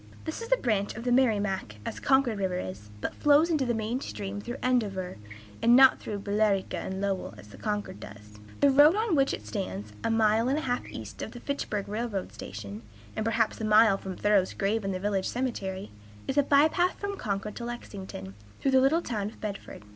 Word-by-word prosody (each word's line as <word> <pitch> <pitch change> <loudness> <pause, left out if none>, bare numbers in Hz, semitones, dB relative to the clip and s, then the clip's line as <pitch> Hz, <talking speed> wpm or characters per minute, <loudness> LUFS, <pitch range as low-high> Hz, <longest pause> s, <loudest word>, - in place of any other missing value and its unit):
(This 315 +7 -4
is 460 +1 -7
a - - +6
branch 210 - 0
of 225 - -6
the 245 - 0
Merrimac, 210 - +1
as - - -4
Concord 265 -6 +2
River 185 -2 -1
is, 100 - -6
but - - -3
flows 295 +3 +4
into 285 -5 +1
the 240 - +1
main 225 +4 -2
stream 205 -4 -5
through 240 +5 -5
Andover, 200 -8 0 0.4
and 235 +1 +6
not 265 0 +7
through 205 -2 -5
Billerica 200 -1 +1
and 190 0 -4
Lowell, 195 -2 -2
as 100 +3 -13
the - - -13
Concord 210 - -3
does.) 105 0 -12 0.2
The 280 - +6
road 295 +6 +7
on 430 -4 +1
which 275 -1 +3
it 105 - -5
stands, 105 0 -5
a - - +1
mile 225 +1 +3
and 275 - +1
a - - -1
half 245 -3 -1
east 110 -3 -8
of 220 - -5
the 240 - -8
Fitchburg 230 -7 -3
railroad 210 -2 -3
station, 100 +1 -7 0.3
and - - -1
perhaps 225 0 0
a - - -2
mile 215 -2 +5
from 190 -1 -6
Thoreau's 205 -3 +2
grave 210 +2 0
in 195 - -1
the 185 - -3
village 195 -1 0
cemetery, 205 -6 -3 0.4
is 270 - -1
a 290 - +6
by 285 +2 +5
path 355 +3 0
from 405 0 -3
Concord 210 - -3
to 235 - -5
Lexington, 190 - -7 0.3
through 270 - +1
the 260 0 +5
little 315 +6 +3
town 210 -4 -2
of 215 - -10
Bedford. 200 - -7
215 Hz, 215 wpm, -28 LUFS, 190-260 Hz, 0.4 s, not